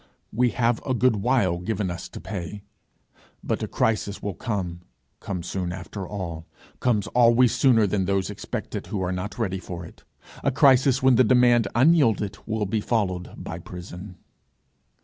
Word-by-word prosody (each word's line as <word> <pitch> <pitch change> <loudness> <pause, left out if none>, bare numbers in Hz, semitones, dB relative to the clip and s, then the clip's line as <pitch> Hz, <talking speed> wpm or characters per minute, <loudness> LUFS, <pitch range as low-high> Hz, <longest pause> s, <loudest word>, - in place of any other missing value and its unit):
We 125 +3 +3
have 120 -1 0
a 130 - -1
good 125 -2 +3
while 100 -6 +1
given 95 0 -2
us 85 - -7
to - - -9
pay, 100 0 -6 0.8
but - - -2
a - - -2
crisis 105 -2 0
will 100 - -4
come 90 -5 -4 0.4
come 90 -4 -5
soon 90 0 -3
after 95 +1 -6
all 85 -5 -6 0.3
comes 110 -5 +1
always 120 0 +5
sooner 120 -5 +4
than 100 -1 0
those 95 0 0
expect - - -6
it - - -4
who 95 -3 -3
are 90 - -1
not 90 +3 -4
ready 95 -5 -1
for 85 -2 -7
it - - -15 0.4
a - - +3
crisis 135 -1 +4
when 130 -2 +5
the 130 - +6
demand 120 -2 +4
unyielded 120 - +3
will 110 -1 -1
be 105 +2 -1
followed 95 -6 -1
by - - -6
prison. 90 +1 -9
105 Hz, 170 wpm, -25 LUFS, 90-120 Hz, 0.8 s, the